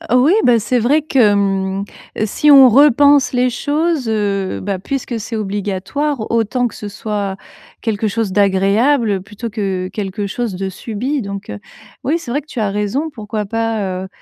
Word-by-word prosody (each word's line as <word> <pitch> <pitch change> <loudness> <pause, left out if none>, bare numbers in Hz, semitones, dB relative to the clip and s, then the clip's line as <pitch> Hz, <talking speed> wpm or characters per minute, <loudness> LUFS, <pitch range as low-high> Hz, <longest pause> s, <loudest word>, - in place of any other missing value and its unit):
Oui 255 +6 +5
bah, 240 -2 +5
c'est 245 +3 0
vrai 275 +7 +2
que, 255 -8 +3
mmh, 195 -1 0 0.4
si 295 +8 +1
on 270 -2 +9
repense 285 +1 +5
les 250 0 +2
choses, 295 +2 -1
heu, 200 -3 -1
bah, 195 -1 -3
puisque 245 +2 -4
c'est 225 +2 -5
obligatoire 210 +6 -2
autant 235 +2 +1
que - - -14
ce 210 - -7
soit 205 -1 -3 0.5
quelque 220 -1 -1
chose 215 -1 -1
d'agréable, 205 +3 +2
plutôt 210 +4 -7
que 195 -4 -3
quelque 205 0 -4
chose 215 0 -3
de 190 +1 -3
subi. 240 +8 -3
Donc, 200 -2 -7
heu, 105 - -6 0.5
oui 300 +6 +2
c'est 330 -8 -7
vrai 285 - 0
que 295 - -14
tu 265 - -6
as 210 - 0
raison, 210 +10 -1
pourquoi 215 -5 -5
pas, 210 -4 -2
heu, - - -7
220 Hz, 175 wpm, -17 LUFS, 200-255 Hz, 0.5 s, on